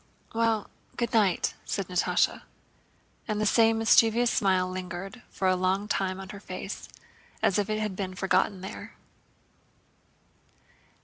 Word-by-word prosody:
"Well, 225 -2 0 0.3
good 235 +1 -1
night," 205 -5 +2
said 195 -3 -3
Natásha. 180 -1 +1 0.9
And 215 -2 -1
the 215 - +1
same 225 +1 +4
mischievous 225 +1 +4
smile 185 -2 +2
lingered 185 +4 -6
for 190 - -1
a 185 - +4
long 185 +3 0
time 190 -2 -1
on 190 0 -8
her 200 - -8
face 195 0 -7 0.5
as 195 - +3
if 205 0 -1
it 215 0 0
had 210 -3 -2
been 185 -1 -4
forgotten 190 +1 +1
there. 190 - -8
195 Hz, 135 wpm, -28 LUFS, 185-215 Hz, 0.9 s, same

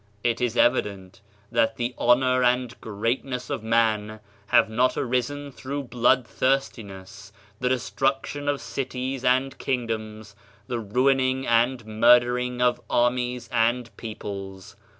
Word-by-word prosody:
It 120 0 0
is 120 -1 -1
evident 100 -7 0 0.3
that 115 -1 +2
the 120 +1 -2
honor 130 +1 +3
and 125 0 +1
greatness 125 +4 -3
of - - -2
man 110 -1 +1 0.3
have - - +4
not 125 +4 +1
arisen 130 +3 -2
through 140 +2 -5
blood 125 0 +2
thirstiness, 105 -7 -3 0.3
the 125 - 0
destruction 135 +3 -1
of 145 -1 -1
cities 130 +2 -4
and 130 +1 +2
kingdoms, 110 -4 -4 0.3
the 120 -2 -3
ruining 130 +4 +1
and 120 +1 +2
murdering 120 +2 +3
of 125 0 +2
armies 120 0 0
and 120 0 0
peoples. 100 -4 -8
120 Hz, 120 wpm, -25 LUFS, 110-130 Hz, 0.3 s, have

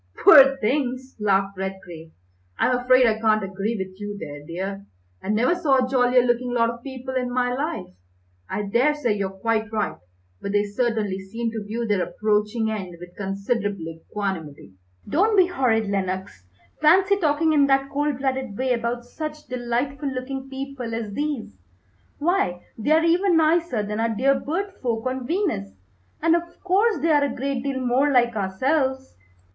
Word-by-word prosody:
"Poor 275 -3 +9
things!" 260 +1 -1
laughed 195 -1 +1
Redgrave. 175 -4 -7 0.5
"I'm 250 - +2
afraid 255 +1 +4
I 220 -1 +2
can't 215 -1 +2
agree 195 +4 -3
with 190 +1 -6
you 205 0 -5
there, 145 -5 -8
dear. 195 +5 -5 0.3
I - - -7
never 230 +9 +3
saw 315 -7 +2
a 255 -1 +2
jollier 250 -1 +3
looking 245 0 0
lot 230 -1 +3
of 235 0 -11
people 260 0 -7
in 250 -1 -1
my 245 0 0
life. 295 - -4 0.6
I 210 - -2
daresay 245 +4 +1
you're 195 -2 -2
quite 220 +3 -1
right, 215 -1 -2 0.4
but 200 - -4
they 205 0 +3
certainly 210 -2 -1
seem 225 +4 -4
to 220 -2 -5
view 225 +3 -3
their 205 -4 +1
approaching 210 +4 0
end 190 -5 -5
with 175 0 -12
considerable 200 -1 -2 0.2
equanimity." 170 - -5 0.4
"Don't 415 +7 +2
be 370 - +7
horrid, 245 - +1
Lenox! 190 - -3 0.4
Fancy 380 +6 +5
talking 315 -2 +2
in 285 -2 +4
that 270 0 +2
cold 290 -1 0
blooded 265 -5 -2
way 260 0 +1
about 235 0 -2
such 305 +4 -7
delightful 255 +4 -2
looking 265 +1 -5
people 265 -4 -5
as 220 -3 -4
these, 290 - -3 0.6
why, 290 - 0
they 225 +5 -3
are 320 +1 +4
even 350 +1 +3
nicer 320 -7 +2
than 210 +1 -4
our 230 0 +1
dear 255 +5 +2
bird 385 +7 -3
folk 230 -2 -2
on 255 -1 -3
Venus, 290 - -1 0.5
and 330 0 +5
of 345 0 -4
course 395 +4 +2
they 330 - +3
are 295 -1 +4
a 280 - -3
great 270 0 -2
deal 270 0 -2
more 255 +3 +2
like 240 -3 +3
ourselves." 265 +7 -1
245 Hz, 170 wpm, -23 LUFS, 205-275 Hz, 0.6 s, Poor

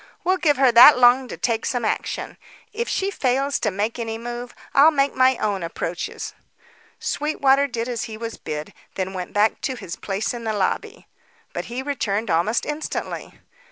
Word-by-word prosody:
We'll 370 +2 +2
give 295 -6 +2
her 265 -2 +5
that 240 +5 +9
long 250 +1 +5
to - - -7
take 230 -2 -1
some 245 -3 -1
action. - - -3 0.4
If 470 +2 -3
she 390 +1 0
fails 275 -3 0
to 215 - 0
make 210 +5 -2
any 225 -1 -3
move, 240 +1 -7 0.2
I'll 285 +3 +7
make 280 -2 +1
my 260 -1 +4
own 205 -3 -1
approaches." 170 +1 -4 0.7
Sweetwater 280 -2 +2
did 235 -2 -3
as 240 -2 -3
he 220 -2 -8
was 230 0 -5
bid, 150 0 -6 0.2
then 190 0 -3
went 180 -1 -5
back 210 +2 +2
to 260 - -2
his 175 -8 -7
place 200 +4 -3
in 240 -1 -6
the 220 -1 -1
lobby. 195 -3 -2 0.5
But - - -4
he 245 +3 -5
returned 225 -7 -2
almost 175 +8 +1
instantly. 300 +1 -5
240 Hz, 180 wpm, -22 LUFS, 215-275 Hz, 0.7 s, that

